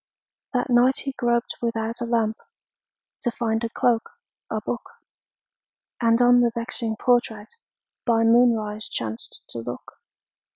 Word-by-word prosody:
That 250 0 0
night 245 +2 +4
he 275 - -2
groped 240 -2 -1
without 230 0 -2
a - - 0
lamp 225 -2 +1 0.8
To 240 - 0
find 225 -1 -1
a 230 - -1
cloak, 230 0 +1 0.4
a - - -1
book, - - -3 1.2
And 230 0 +4
on 245 0 +6
the 240 - +4
vexing 230 -1 -2
portrait 225 -3 0 0.5
By 230 -2 +3
moonrise 225 -2 +3
chanced 110 -1 -5
to 115 - -5
look. 120 +1 -8
230 Hz, 130 wpm, -24 LUFS, 220-240 Hz, 1.2 s, on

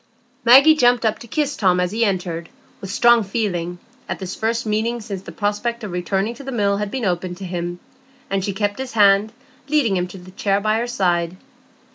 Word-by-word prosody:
Maggie 270 +6 +8
jumped 245 -4 +3
up 220 - +1
to 235 - -11
kiss 290 +3 -1
Tom 185 -6 +2
as 180 0 0
he 225 +2 0
entered, 180 -5 -2 0.3
with 195 - -7
strong 235 +4 +5
feeling, 185 -5 -2 0.3
at - - -2
this 190 -2 -6
first 230 +1 -1
meeting 220 +3 -1
since 205 -4 -6
the - - -10
prospect 225 +3 -2
of 210 - -5
returning 190 +5 -1
to 250 - -11
the 270 - -5
Mill 200 -4 +1
had 210 0 -2
been 255 0 -3
opened 180 -1 -2
to 195 - -7
him; 175 0 -4 0.5
and 195 -1 -1
she 200 - -1
kept 205 +3 -2
his 265 -1 -5
hand, 205 0 +4 0.4
leading 280 -9 +2
him 180 0 0
to 180 - -11
the 185 0 -13
chair 195 +1 0
by 215 +2 +1
her 240 - -2
side. 175 -6 0
205 Hz, 210 wpm, -21 LUFS, 185-235 Hz, 0.5 s, Maggie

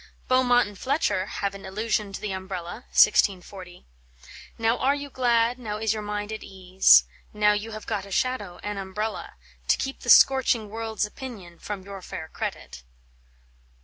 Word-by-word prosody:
Beaumont 245 -2 +4
and 205 -2 -12
Fletcher 210 - 0
have 200 -1 -3
an 200 - -10
allusion 210 +1 -2
to 195 - -6
the 210 - -4
umbrella 190 +3 -6
(1640); 185 -3 +2 0.7
"Now 225 +1 +1
are 275 +2 +2
you 285 -1 -7
glad, 240 -1 +2
now 210 -4 -4
is 220 0 0
your 215 - -4
mind 210 0 -4
at 215 - -6
ease, 190 0 +4 0.3
Now 210 0 +3
you 210 +2 -3
have 215 -1 -8
got 200 -3 -3
a - - -13
shadow, 205 -6 -1
an 205 -1 -4
umbrella, 210 +3 -5 0.3
To - - +4
keep 270 0 -4
the 240 - -7
'scorching 245 -5 +5
world's 220 -1 -2
opinion 210 -7 -10
From 205 -4 -6
your 195 0 -9
fair 160 -2 -7
credit." 60 - -6
210 Hz, 165 wpm, -25 LUFS, 195-230 Hz, 0.7 s, scorching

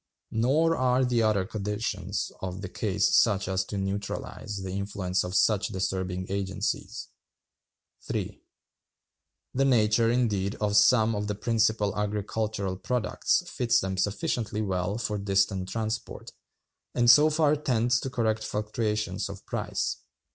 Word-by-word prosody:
Nor 150 +9 +2
are 130 0 +2
the 120 -2 +1
other 105 -4 +2
conditions 100 -1 -3
of 95 0 -5
the 95 - -5
case - - 0
such 100 -2 +3
as 95 0 0
to 100 - -5
neutralize 100 +1 -4
the 95 - -5
influence 95 -1 -1
of 90 +1 -5
such 105 -2 +3
disturbing 95 -2 -2
agencies. 95 -1 -3 1.0
(3.) - - -4 1.1
The 135 - +2
nature, 115 -3 +3
indeed, 110 -5 0
of 105 -1 -1
some 115 0 +5
of 105 -1 -2
the 105 - -2
principal 110 -2 +1
agricultural 105 -1 -2
products 120 +2 0
fits 120 -1 +2
them 95 0 -2
sufficiently 105 +3 -1
well 95 +1 -1
for 105 -3 -2
distant 95 -1 +1
transport, 110 -1 -4 0.6
and 120 -1 +2
so 150 +6 +8
far 155 -1 +3
tends 125 -4 +1
to 135 - -4
correct 110 -3 0
fluctuations 105 -2 -2
of 100 0 -9
price. - - -2
105 Hz, 135 wpm, -27 LUFS, 95-115 Hz, 1.1 s, so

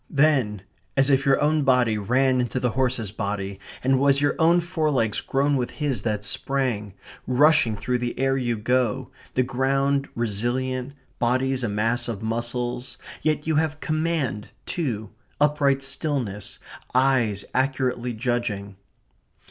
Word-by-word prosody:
Then 135 - +2 0.3
as 135 +1 +4
if 135 +1 +2
your 135 - +4
own 150 +1 +2
body 125 -5 +3
ran 125 +5 +2
into 125 +1 -2
the 125 -2 0
horse's 125 -5 0
body 100 -2 -3 0.2
and 135 +1 +3
it - - +4
was 140 +1 +4
your 145 0 +2
own 170 +2 +5
forelegs 155 - 0
grown 140 +1 +1
with 125 -1 -1
his 140 -8 -2
that 105 -1 -2
sprang, 110 -3 -2 0.3
rushing 130 -3 +4
through 125 +4 -1
the 120 0 -3
air 135 0 +2
you 120 -3 -1
go, 125 +3 0 0.2
the 130 - +3
ground 135 +2 +1
resilient, 125 +4 -2 0.3
bodies 130 +2 +1
a 115 - 0
mass 115 +4 0
of 110 -3 -4
muscles, 120 +2 -3 0.2
yet 155 -1 0
you 160 -1 +1
have 155 -1 0
command 155 -10 -1 0.2
too, 110 - -3 0.3
upright 145 -2 +2
stillness, 130 -8 -2 0.4
eyes 125 -6 +2
accurately 130 -2 0
judging. 110 -4 -2
130 Hz, 140 wpm, -24 LUFS, 115-140 Hz, 0.4 s, own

